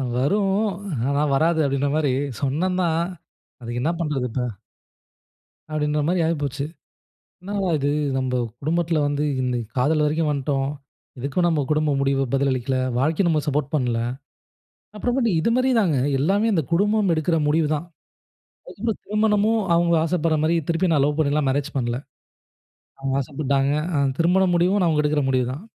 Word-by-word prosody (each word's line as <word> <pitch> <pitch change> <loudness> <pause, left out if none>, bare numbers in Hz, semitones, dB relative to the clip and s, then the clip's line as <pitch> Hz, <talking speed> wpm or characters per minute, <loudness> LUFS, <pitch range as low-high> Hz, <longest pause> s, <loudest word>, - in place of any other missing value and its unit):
வரும் 195 +10 +1 0.5
ஆனா 140 +1 +1
வராது 160 +2 +2
அப்டின்ற 140 0 0
மாரி, 145 -4 +1 0.3
சொன்னந்தாந் 170 +3 0 0.6
அதுக்கு 120 +1 -4
என்ன 165 - +2
பண்றது 150 -6 -1
இப்ப? 125 +2 -2 1.3
அப்டின்ற 150 0 0
மாரி 175 0 +1
ஆயி 165 +1 +1
போச்சு. 140 0 -2 0.8
என்னடா 195 0 -2
இது 140 +1 0 0.3
நம்ப 130 -1 -1 0.3
குடும்பத்தில 165 +1 0
வந்து 145 +1 -1 0.2
இந்த 125 -1 -1 0.2
காதல் 150 +4 +2
வரைக்கு 155 +2 0
வந்துட்டோம். 140 -1 -1 0.5
இதுக்கும் 145 +7 0
நம்ம 160 -4 +1
குடும்ப 150 0 +1
முடிவு 135 0 +1
பதிலளிக்கல. 135 -1 0 0.2
வாழ்க்கை 155 +7 +1
நம்ம 155 -3 +2
சப்போர்ட் 145 0 -1
பண்ணல. 125 -5 0 1.0
அப்புறமாட்டு 240 +1 0
இது 170 - +1
மாரி 255 +1 +2
தாங்க 170 -10 +2 0.2
எல்லாமே 200 +9 +2
இந்த 165 -5 +1
குடும்பம் 205 0 +2
எடுக்குற 165 +1 +1
முடிவுதா. 155 0 +1 0.9
அதுக்கப்புறம் 225 -3 -4
திருமணமும் 215 +1 +2
அவங்க 170 0 +2
ஆசப்படுற 165 -1 +1
மாரி 165 +2 +2
திருப்பி 170 +2 +1
நா - - +3
லவ் 150 +1 -1
பண்ணிலா 150 0 +2
மேரேஜ் 145 +2 -2
பண்ணல. 120 -1 -1 1.0
அவங்க 135 0 -2
ஆசைப்பட்டாங்க 140 0 0 0.2
அ - - +2 0.2
திருமணம் 180 +2 +3
முடிவு 180 +3 +3
அவங்க 155 -2 +2
எடுக்குற 150 0 +1
முடிவுதான். 130 +4 -1
155 Hz, 140 wpm, -23 LUFS, 140-175 Hz, 1.3 s, நா